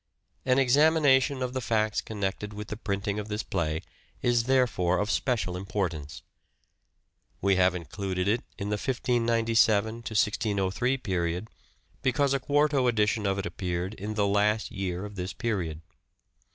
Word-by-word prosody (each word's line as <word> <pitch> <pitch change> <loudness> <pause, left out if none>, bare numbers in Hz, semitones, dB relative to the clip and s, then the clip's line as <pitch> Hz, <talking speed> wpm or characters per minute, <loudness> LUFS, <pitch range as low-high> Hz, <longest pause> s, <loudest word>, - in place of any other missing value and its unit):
An 130 0 +4
examination 135 -1 +4
of 125 0 -3
the 130 - -2
facts 110 -2 +1
connected 105 0 -4
with 105 0 -7
the - - -3
printing 100 -1 -2
of 105 - -5
this 105 0 -3
play 80 -1 -2 0.4
is 120 -1 +2
therefore 115 -9 +2
of 105 +1 0
special 105 -9 0
importance. 90 -4 -3 1.2
We 100 0 +3
have 90 -1 +4
included 90 +2 -3
it 115 +4 +1
in 100 -1 -4
the 105 - 0
1597 115 -4 +2
1603 110 +1 0
period 90 -2 -2 0.5
because 135 +2 +2
a 135 - +1
quarto 145 -1 +2
edition 105 -2 +1
of 95 0 0
it 95 - -2
appeared 90 +2 -3
in 105 +1 -5
the 105 -1 +2
last 105 +2 +1
year 95 0 -3
of 105 -1 -9
this 90 +1 -4
period. 90 -9 -2
105 Hz, 145 wpm, -28 LUFS, 95-120 Hz, 1.2 s, An